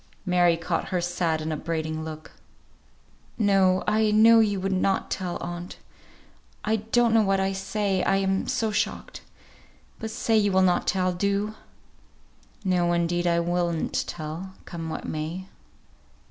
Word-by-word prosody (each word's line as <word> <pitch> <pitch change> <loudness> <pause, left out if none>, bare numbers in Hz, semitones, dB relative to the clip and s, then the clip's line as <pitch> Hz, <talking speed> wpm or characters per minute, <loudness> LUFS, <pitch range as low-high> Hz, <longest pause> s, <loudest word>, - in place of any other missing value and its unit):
Mary 175 -2 +3
caught 165 0 -2
her 185 - 0
sad 175 -2 -1
and 155 0 -2
upbraiding 155 0 -3
look. 155 -1 -8 1.1
"No! 195 -3 +3
I 215 0 +2
know 225 +2 +6
you 205 -3 +2
would 195 +1 -2
not 190 +1 0
tell, 180 -2 -2
aunt. 175 +1 -6 0.9
I 220 +1 +2
don't 225 +2 +2
know 225 - +5
what 195 -2 +2
I 190 0 +1
say, 195 0 -1
I - - +2
am 195 0 0
so 220 -2 0
shocked. 205 - -3 0.8
But 220 - -4
say 225 +1 0
you 205 -2 +3
will 190 0 +4
not 180 -1 +2
tell. 185 -2 +1
Do." 200 +3 -1 1.1
"No, 175 -2 +2
indeed 175 +1 0
I 170 0 +2
will 175 0 0
not 165 - -3
tell, 170 +4 -6
come 165 -2 -6
what - - -5
may." 160 +4 -4
185 Hz, 150 wpm, -25 LUFS, 170-200 Hz, 1.1 s, know